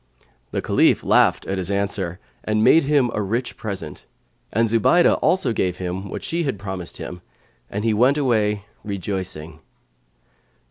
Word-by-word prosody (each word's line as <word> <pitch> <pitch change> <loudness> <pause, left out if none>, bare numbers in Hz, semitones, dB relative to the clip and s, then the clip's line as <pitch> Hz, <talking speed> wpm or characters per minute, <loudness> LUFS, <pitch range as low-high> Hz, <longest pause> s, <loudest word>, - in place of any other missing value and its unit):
The - - -3
Caliph - - +3
laughed - - +3
at 95 0 -2
his 90 0 -2
answer[FN#122] 100 -3 -1 0.3
and 110 0 +1
made 150 +6 +6
him 140 -4 +2
a 105 - -1
rich 115 +5 -2
present; 100 -4 -6 0.4
and 115 +2 +2
Zubaydah 115 - +4
also 180 -10 +2
gave 90 -4 -1
him 95 +2 -4
what - - -6
she 170 +1 -2
had 135 -9 -1
promised 95 -3 -6
him, 90 -1 -7 0.5
and 105 +1 -4
he 115 - +3
went 125 +7 +3
away, 105 -7 +1 0.2
rejoicing. 95 -6 -4
105 Hz, 150 wpm, -22 LUFS, 95-120 Hz, 0.5 s, made